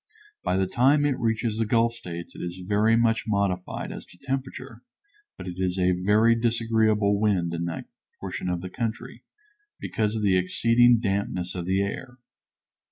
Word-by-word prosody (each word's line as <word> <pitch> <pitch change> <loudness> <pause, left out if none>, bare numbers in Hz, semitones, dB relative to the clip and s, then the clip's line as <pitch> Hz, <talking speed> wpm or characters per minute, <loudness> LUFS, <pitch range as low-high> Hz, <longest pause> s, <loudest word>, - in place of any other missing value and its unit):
By 90 - 0
the 95 - +2
time 135 +9 +3
it 140 -3 0
reaches 115 -1 -1
the 115 - +2
Gulf 115 +1 +2
States 85 -7 -8
it - - -10
is 90 +1 -6
very 105 +2 +3
much 115 0 +2
modified 100 -3 -1
as - - -7
to - - -17
temperature, 130 +1 -5 0.6
but - - -8
it 90 -1 -6
is 90 0 0
a 90 0 +3
very 105 +6 +3
disagreeable 110 -3 +2
wind 95 -6 +1
in 85 0 -2
that 85 - -5 0.3
portion 90 - -4
of 90 -1 -2
the 95 - -6
country, 115 +1 -5 0.6
because 110 0 -1
of 110 - -2
the 95 -2 +4
exceeding 115 +6 +4
dampness 95 -4 -2
of 90 -2 -4
the 95 +1 +2
air. 125 +5 -6
105 Hz, 170 wpm, -25 LUFS, 90-115 Hz, 0.6 s, the